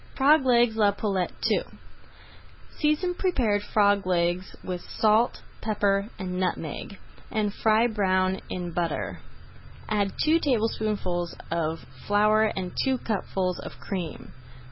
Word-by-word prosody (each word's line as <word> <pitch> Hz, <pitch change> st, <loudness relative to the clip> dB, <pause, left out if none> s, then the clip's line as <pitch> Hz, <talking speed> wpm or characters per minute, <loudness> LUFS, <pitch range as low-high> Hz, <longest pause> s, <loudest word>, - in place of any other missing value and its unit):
FROG 290 Hz, +2 st, +5 dB
LEGS 240 Hz, -2 st, +4 dB
À -, -, -3 dB
LA 205 Hz, -1 st, +5 dB
POULETTE 195 Hz, -3 st, -1 dB
II -, -, +2 dB, 1.2 s
Season 305 Hz, +4 st, +1 dB
prepared 245 Hz, -, +1 dB
frog 205 Hz, -2 st, +2 dB
legs 175 Hz, 0 st, 0 dB
with 180 Hz, -1 st, -4 dB
salt, 220 Hz, +2 st, +1 dB, 0.2 s
pepper, 205 Hz, -1 st, +1 dB
and 185 Hz, -2 st, -4 dB
nutmeg, 180 Hz, +1 st, -3 dB, 0.3 s
and 210 Hz, -2 st, -1 dB
fry 220 Hz, +2 st, +3 dB
brown 190 Hz, -4 st, +1 dB
in 175 Hz, -1 st, -4 dB
butter. 130 Hz, -, -2 dB, 0.7 s
Add 205 Hz, -2 st, 0 dB
two 320 Hz, +2 st, +4 dB
tablespoonfuls 215 Hz, -, -1 dB, 0.2 s
of 165 Hz, -1 st, -2 dB, 0.2 s
flour 215 Hz, +1 st, +4 dB
and 190 Hz, -4 st, -2 dB
two 265 Hz, -1 st, +1 dB
cupfuls 190 Hz, -5 st, -2 dB
of -, -, -8 dB
cream. 180 Hz, -6 st, -5 dB
205 Hz, 120 wpm, -26 LUFS, 180-220 Hz, 1.2 s, FROG